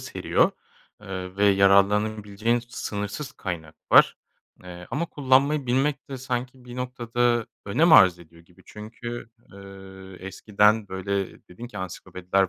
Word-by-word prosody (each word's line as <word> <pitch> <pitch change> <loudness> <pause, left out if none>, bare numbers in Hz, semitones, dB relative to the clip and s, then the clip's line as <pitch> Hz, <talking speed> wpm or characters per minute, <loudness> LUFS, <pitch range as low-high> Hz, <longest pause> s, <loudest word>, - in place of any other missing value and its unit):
seriyor, - - +1 0.5
eee, 95 -2 -7
ve 100 - +2
yararlanabileceğin 100 +3 +3
sınırsız 105 +4 -5
kaynak 80 -4 -6 0.2
var, - - +7 0.5
eee, 90 -1 -10
ama 170 +4 -2
kullanmayı 140 0 +2
bilmek 135 +4 0
de 135 - -4
sanki 125 0 -5
bir 125 0 -10
noktada 120 -2 -1 0.2
önem 155 +12 +3
arz 90 - +7
ediyor 85 0 -17
gibi. 90 +2 -23
Çünkü, 120 +2 -8 0.2
eee, 95 -1 -12
eskiden, 105 +2 +2
böyle, 95 +1 -3
dedin 105 +7 -9
ki 105 -4 -9
ansiklopediler 95 +1 -2
105 Hz, 125 wpm, -25 LUFS, 95-120 Hz, 0.5 s, var